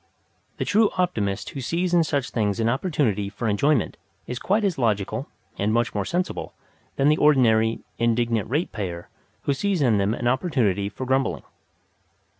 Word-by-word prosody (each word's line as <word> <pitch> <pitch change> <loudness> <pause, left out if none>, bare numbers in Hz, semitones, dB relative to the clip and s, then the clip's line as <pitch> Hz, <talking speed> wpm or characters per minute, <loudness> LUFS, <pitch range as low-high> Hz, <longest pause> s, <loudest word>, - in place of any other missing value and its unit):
The - - -2
true 215 +1 +4
optimist 105 - -1
who 135 - -6
sees 175 +7 -1
in 170 -1 +5
such 140 -4 -1
things 105 -3 0
an 115 - +1
opportunity 115 - 0
for 105 +3 -4
enjoyment 120 +5 +1 0.3
is 125 0 -5
quite 210 +3 +1
as 190 -8 0
logical 105 -5 0 0.3
and 105 +2 +1
much 120 +1 +1
more 100 -2 -1
sensible 180 - -3 0.4
than 135 - +2
the 150 +1 +4
ordinary 115 -6 +3 0.2
"Indignant 115 -2 +1
Ratepayer" 100 - -3 0.3
who 140 - +1
sees 195 +5 0
in 120 -7 +3
them 100 +3 +1
an 120 - -2
opportunity 120 - +1
for 130 +5 -6
grumbling. 130 +1 0
120 Hz, 160 wpm, -24 LUFS, 105-150 Hz, 0.4 s, in